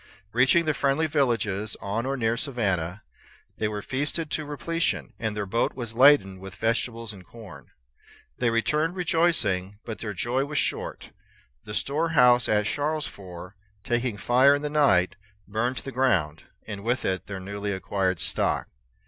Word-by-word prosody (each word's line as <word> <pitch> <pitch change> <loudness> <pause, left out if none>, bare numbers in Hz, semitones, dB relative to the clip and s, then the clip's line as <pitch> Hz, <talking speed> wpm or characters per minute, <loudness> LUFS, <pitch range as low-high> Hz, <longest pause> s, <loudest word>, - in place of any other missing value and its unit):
Reaching 130 +8 +4
the 155 - +2
friendly 140 +3 +1
villages, 115 -9 0
on 115 +5 -2
or 135 0 -1
near 115 -2 +1
the 115 - -3
Savannah, 95 - -1 0.6
they 110 - +1
were 105 -1 -4
feasted 145 +4 -2
to 155 - -1
repletion, 165 +4 -2
and 110 -2 -2
their 105 - -1
boat 110 +5 0
was 120 -3 -5
laden 125 -7 +5
with 95 0 -9
vegetables 115 -1 -1
and 95 -2 -12
corn. 90 - -12 0.7
They 120 - +2
returned 150 - +1
rejoicing; 165 - +1
but 110 -2 -6
their 105 -3 -5
joy 125 +8 0
was 150 +1 -4
short. - - -2 0.5
Their 105 - -6
store 155 +4 0
house 125 -1 +6
at 105 -1 +2
Charlesfort, 100 - -4 0.3
taking 120 -2 -1
fire 130 +6 +5
in 145 - -4
the 150 - -2
night, 105 -14 +3 0.3
burned 115 +5 -1
to - - -6
the 135 - -5
ground, 95 - +1 0.2
and 100 -2 -7
with 120 +3 0
it 95 0 -1
their 100 -2 -5
newly 100 +2 -4
acquired 95 -2 -1
stock. - - 0
115 Hz, 165 wpm, -26 LUFS, 100-140 Hz, 0.7 s, house